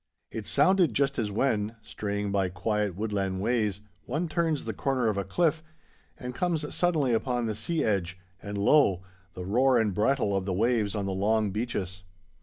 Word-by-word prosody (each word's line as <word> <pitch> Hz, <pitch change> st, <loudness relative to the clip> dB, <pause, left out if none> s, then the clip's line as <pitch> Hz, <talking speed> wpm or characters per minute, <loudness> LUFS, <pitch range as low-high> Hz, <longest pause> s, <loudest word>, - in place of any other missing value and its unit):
It 110 Hz, -2 st, -6 dB
sounded 185 Hz, -, +3 dB
just 140 Hz, -1 st, +1 dB
as 110 Hz, -3 st, 0 dB
when, 110 Hz, 0 st, 0 dB
straying 100 Hz, -1 st, -3 dB
by 100 Hz, -2 st, +1 dB
quiet 100 Hz, +1 st, -1 dB
woodland 100 Hz, -2 st, -2 dB
ways, 105 Hz, -2 st, 0 dB, 0.3 s
one 155 Hz, +8 st, -1 dB
turns 160 Hz, -2 st, 0 dB
the 110 Hz, -, -3 dB
corner 130 Hz, +1 st, 0 dB
of 105 Hz, -, -1 dB
a 100 Hz, -, -1 dB
cliff 160 Hz, -, +1 dB, 0.6 s
and 125 Hz, -1 st, -6 dB
comes 160 Hz, 0 st, -1 dB
suddenly 155 Hz, -8 st, +2 dB
upon 120 Hz, +1 st, 0 dB
the 110 Hz, -, -1 dB
sea 160 Hz, +8 st, -1 dB
edge, 95 Hz, -4 st, 0 dB, 0.2 s
and 100 Hz, 0 st, -5 dB
lo! 100 Hz, -, +4 dB, 0.3 s
the 90 Hz, -, -6 dB
roar 125 Hz, +6 st, +3 dB
and 110 Hz, -4 st, +1 dB
brattle 105 Hz, 0 st, +1 dB
of 95 Hz, -1 st, -1 dB
the 95 Hz, -, -1 dB
waves 110 Hz, 0 st, +1 dB
on 100 Hz, -2 st, -2 dB
the 100 Hz, -, -2 dB
long 105 Hz, +2 st, +1 dB
beaches. 95 Hz, -4 st, -3 dB
110 Hz, 180 wpm, -28 LUFS, 100-135 Hz, 0.6 s, lo